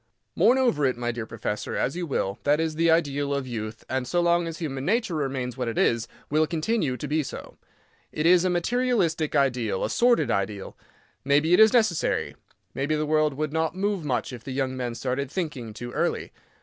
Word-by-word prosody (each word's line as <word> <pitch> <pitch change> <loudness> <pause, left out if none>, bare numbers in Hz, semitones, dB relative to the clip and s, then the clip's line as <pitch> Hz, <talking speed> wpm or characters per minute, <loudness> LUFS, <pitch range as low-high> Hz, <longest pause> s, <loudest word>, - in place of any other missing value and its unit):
Mourn 250 - +5
over 240 - +2
it, 130 - -1
my 120 0 -1
dear 115 -1 -5
professor, 105 -2 -4
as 135 - -1
you 175 -1 -3
will—that 140 +4 0
is 160 -1 0
the 165 +2 +2
ideal 145 -3 +1
of 140 -1 -2
youth; 110 -3 -6
and, 130 -1 -2
so 175 - +1
long 170 0 +2
as 165 0 -5
human 135 -6 -4
nature 220 - 0
remains 135 -5 -2
what 125 -2 -2
it 115 - -3
is, 115 -1 +2 0.2
will 155 +1 +2
continue 160 - -1
to 150 - -5
be 155 +2 +1
so. 140 - -8 0.5
It 150 - -2
is 175 +1 +6
a 185 - +2
materialistic 175 -4 0
ideal—a 125 -8 +1
sordid 235 - +3
ideal. 100 -1 -2 0.5
Maybe 145 +5 +3
it - - +6
is 220 0 +8
necessary. 220 -9 +1 0.4
Maybe 140 +3 -1
the 155 0 -1
world 155 -1 +2
would 155 +1 -3
not 160 +1 0
move 200 -2 -1
much 125 -3 -2
if 120 -2 -9
the 130 - -6
young 130 -1 -1
men 125 -2 -3
started 130 +3 -2
thinking 150 - -4
too 120 +3 -7
early. - - -1
150 Hz, 200 wpm, -25 LUFS, 125-170 Hz, 0.5 s, is